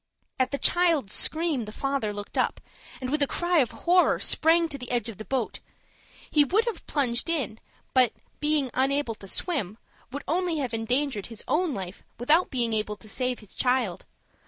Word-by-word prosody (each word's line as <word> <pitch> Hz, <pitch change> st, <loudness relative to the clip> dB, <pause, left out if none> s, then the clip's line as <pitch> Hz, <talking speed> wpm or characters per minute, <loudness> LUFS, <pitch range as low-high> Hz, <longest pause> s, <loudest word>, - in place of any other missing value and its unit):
At 255 Hz, 0 st, +3 dB
the 280 Hz, -, -2 dB
child's 330 Hz, -, +2 dB
scream, 315 Hz, -7 st, +1 dB
the 210 Hz, -, -7 dB
father 275 Hz, -3 st, -1 dB
looked 205 Hz, 0 st, -7 dB
up, -, -, +1 dB, 0.4 s
and, 255 Hz, 0 st, -4 dB
with 300 Hz, 0 st, +1 dB
a 285 Hz, -, +4 dB
cry 345 Hz, +2 st, +2 dB
of 255 Hz, -, +3 dB, 0.2 s
horror, 360 Hz, +1 st, +5 dB
sprang 330 Hz, +1 st, +3 dB
to 285 Hz, -, -2 dB
the 250 Hz, -, -7 dB
edge 240 Hz, -2 st, 0 dB
of 215 Hz, -, -8 dB
the 215 Hz, -, -6 dB
boat. 260 Hz, -5 st, -2 dB, 0.7 s
He 295 Hz, -, +6 dB
would 410 Hz, -, +2 dB
have 470 Hz, -, -4 dB
plunged 250 Hz, -1 st, 0 dB
in, 255 Hz, -10 st, -1 dB, 0.3 s
but, 255 Hz, -3 st, +5 dB, 0.3 s
being 295 Hz, -4 st, +1 dB
unable 270 Hz, -1 st, +1 dB
to 200 Hz, -2 st, -12 dB
swim, 220 Hz, -, -1 dB, 0.3 s
would 285 Hz, +2 st, -5 dB
only 345 Hz, +1 st, +1 dB
have 260 Hz, -5 st, -2 dB
endangered 240 Hz, 0 st, 0 dB
his 225 Hz, -2 st, -7 dB
own 325 Hz, -2 st, +1 dB
life, 190 Hz, -1 st, -6 dB, 0.2 s
without 300 Hz, +9 st, +3 dB
being 240 Hz, -4 st, 0 dB
able 210 Hz, -1 st, 0 dB
to 215 Hz, -, -13 dB
save 250 Hz, +3 st, -2 dB
his 210 Hz, -, -12 dB
child. 250 Hz, -8 st, 0 dB
260 Hz, 185 wpm, -27 LUFS, 225-310 Hz, 0.7 s, He